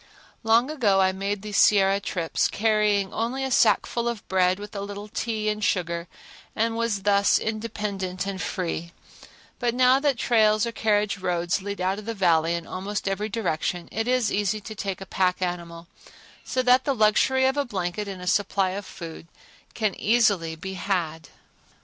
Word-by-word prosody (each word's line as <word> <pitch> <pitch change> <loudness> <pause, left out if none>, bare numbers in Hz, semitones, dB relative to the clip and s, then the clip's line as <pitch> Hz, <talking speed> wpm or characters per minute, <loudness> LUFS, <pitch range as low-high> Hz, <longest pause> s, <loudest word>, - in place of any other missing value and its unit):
Long 230 +5 +3
ago 215 -10 +2
I 190 0 +4
made 195 +1 -3
these 210 -1 -3
Sierra 195 -1 +5
trips, 175 -4 -1
carrying 210 -2 +1
only 245 +4 -2
a 265 - -2
sackful 235 -1 +2
of 235 -3 -4
bread 185 -1 +2
with 210 +1 -9
a 200 - -3
little 205 +1 -7
tea 215 0 -3
and 210 0 -1
sugar 170 -3 -1 0.5
and 225 +1 0
was 230 -4 -1
thus 200 0 +4
independent 210 -4 -3
and 195 -1 -4
free, 170 -2 -3 0.7
but 240 -1 0
now 255 +1 +5
that 280 -3 +1
trails 215 -2 +3
or 235 - -3
carriage 210 -3 0
roads 175 +1 -1
lead 200 0 -5
out 190 +2 0
of 210 - -10
the 230 0 -4
Valley 170 -3 +2
in 170 -1 -5
almost 195 +3 -4
every 205 +2 -1
direction 180 -4 -2
it 225 +2 -2
is 250 -3 +2
easy 205 +1 0
to 220 - -8
take 195 -3 -4
a - - -6
pack 185 -1 0
animal, 170 -2 -4 0.6
so 255 - -1
that 250 +1 +5
the 275 - 0
luxury 250 +4 +3
of 265 +1 +2
a 285 - +1
blanket 200 -3 -3
and 190 -2 -7
a - - -6
supply 195 0 +1
of 200 +1 -6
food 165 -1 -9 0.5
can 215 -4 0
easily 200 -8 +2
be 190 +4 -7
had. 175 -4 -2
200 Hz, 180 wpm, -25 LUFS, 185-225 Hz, 0.7 s, Sierra